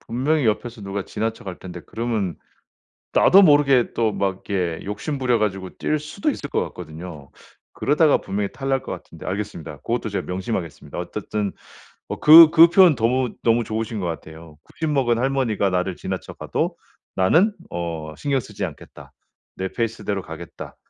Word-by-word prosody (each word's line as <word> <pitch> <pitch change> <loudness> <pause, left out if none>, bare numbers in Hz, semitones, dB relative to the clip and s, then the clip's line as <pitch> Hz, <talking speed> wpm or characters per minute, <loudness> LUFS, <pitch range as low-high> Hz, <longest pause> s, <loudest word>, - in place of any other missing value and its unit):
분명히 135 +4 0
옆에서 115 +2 -1
누가 100 0 -4
지나쳐 110 +1 -4
갈 95 -2 -6
텐데 90 -2 -8
그러면 110 -7 -2 0.8
나도 195 +2 +6
모르게 145 -6 +4
또 110 -2 +1
막 95 -1 -2
이렇게 90 -5 -1
욕심 105 +9 -4
부려 125 -3 +2
가지고 95 -3 -2
뛸 155 - -1
수도 155 - -2
있을 145 - -5
것 - - +1
같거든요. 80 -3 -9 0.4
그러다가 150 +1 +3
분명히 100 +1 -3
탈날 135 -1 -1
것 - - -6
같은데 - - -10
알겠습니다. 90 -6 -5
고것도 115 -1 -2
제가 100 - -3
명심하겠습니다. 90 -3 -4
어쨌든 105 -2 -3 0.6
어 - - -4
그 160 +1 +10
그 165 +1 +8
표현 175 -3 +6
너무 125 +2 +1
너무 115 0 +3
좋으신 110 0 -3
것 90 - -2
같아요. 80 -1 -8
'90 160 -1 -4
먹은 125 -5 +2
할머니가 125 -7 +1
나를 90 0 -1
지나쳐 - - -5
가도 - - -2 0.4
나는 165 - +4 0.2
어 85 -3 -4
신경 140 -2 0
쓰지 105 -4 -6
않겠다. 80 -6 -10 0.4
내 95 - -3
페이스대로 110 -3 -3
가겠다.' 80 0 -9
110 Hz, 360 characters per minute, -22 LUFS, 95-135 Hz, 0.8 s, 그